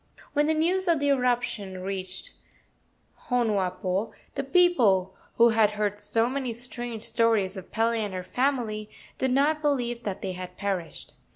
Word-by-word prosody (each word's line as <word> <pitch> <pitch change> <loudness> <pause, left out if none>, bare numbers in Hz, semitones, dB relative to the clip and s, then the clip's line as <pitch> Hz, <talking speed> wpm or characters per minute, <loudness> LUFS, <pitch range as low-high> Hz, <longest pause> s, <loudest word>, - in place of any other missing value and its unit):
When 295 0 +2
the 315 - +2
news 360 +4 +1
of 335 -3 +3
the 285 0 +1
eruption 240 -8 0
reached 190 -1 -4 1.0
Honuapo, 200 -4 0 0.2
the 275 - -2
people, 250 - +3 0.2
who 235 0 +6
had 220 -2 +3
heard 205 -1 -1
so 215 +3 +1
many 260 -2 -2
strange 240 -1 -5
stories 225 -6 +2
of 190 -2 -9
Pele 230 +1 +1
and 205 -2 -4
her 185 - -4
family, 230 -2 -1 0.3
did 260 - +1
not 290 +4 +2
believe 245 -5 0
that 200 -4 -5
they 190 - -2
had 180 0 -8
perished. 190 -4 -4
230 Hz, 155 wpm, -27 LUFS, 195-260 Hz, 1.0 s, who